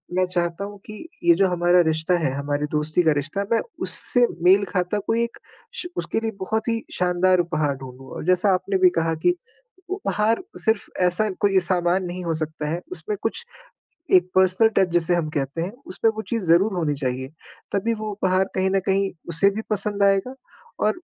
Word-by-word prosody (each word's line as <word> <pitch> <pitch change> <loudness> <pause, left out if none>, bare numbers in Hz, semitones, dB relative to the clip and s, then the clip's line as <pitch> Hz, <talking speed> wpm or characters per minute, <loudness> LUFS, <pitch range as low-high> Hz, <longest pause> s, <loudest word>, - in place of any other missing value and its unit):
मैं 185 0 +3
चाहता 175 +1 -2
हूँ 205 0 -9
कि 215 +8 -9 0.2
ये 170 -1 +6
जो 195 +1 +3
हमारा 175 0 +4
रिश्ता 160 +2 +1
है, 145 -5 0
हमारी 145 +1 -1
दोस्ती 155 +3 +1
का 160 - +4
रिश्ता, 160 +8 -2
मैं 230 - +3 0.2
उससे 245 -1 +2 0.2
मेल 195 +3 +5
खाता 180 +3 0
कोई 230 +1 +2
एक 235 - -5 0.4
श 360 - -1
उसके - - -1
लिए 225 0 -2
बहुत 220 +4 -2
ही 230 0 -1
शानदार 180 0 +2
उपहार 155 -5 0
ढूँढूँ। 130 0 -11
और - - -6
जैसा 185 +2 +3
आपने 190 +1 -1
भी 185 -1 +6
कहा 165 0 0
कि 355 - +4 0.6
उपहार 225 - 0 0.2
सिर्फ़ 220 -2 +1 0.2
ऐसा 180 +4 +2
कोई 195 -2 +4
सामान 180 +1 +1
नहीं 180 +1 -5
हो 165 - 0
सकता 155 -1 -3
है, 170 +2 -2
उसमें 420 +2 -4
कुछ 475 - -1 0.7
एक 180 0 +2
पर्सनल 190 +4 +4
टच 190 -2 +3
जिसे 175 0 +2
हम 160 -3 -1
कहते 145 +3 -2
हैं, 190 +4 -4
उसमें 220 +4 +1
वो 220 - -3
चीज़ 230 -5 -1
ज़रूर 190 +5 +4
होनी 155 -4 0
चाहिए। 130 -1 -3 0.4
तभी 225 +4 0
वो 215 -1 -5
उपहार 190 -1 +1
कहीं 190 0 +1
न 195 0 +2
कहीं 195 0 +1 0.2
उसे 185 +5 +3
भी 220 - -2
पसंद 205 0 -1
आएगा, 200 +6 +2 0.5
और 215 +11 +1
185 Hz, 195 wpm, -23 LUFS, 165-205 Hz, 0.7 s, ये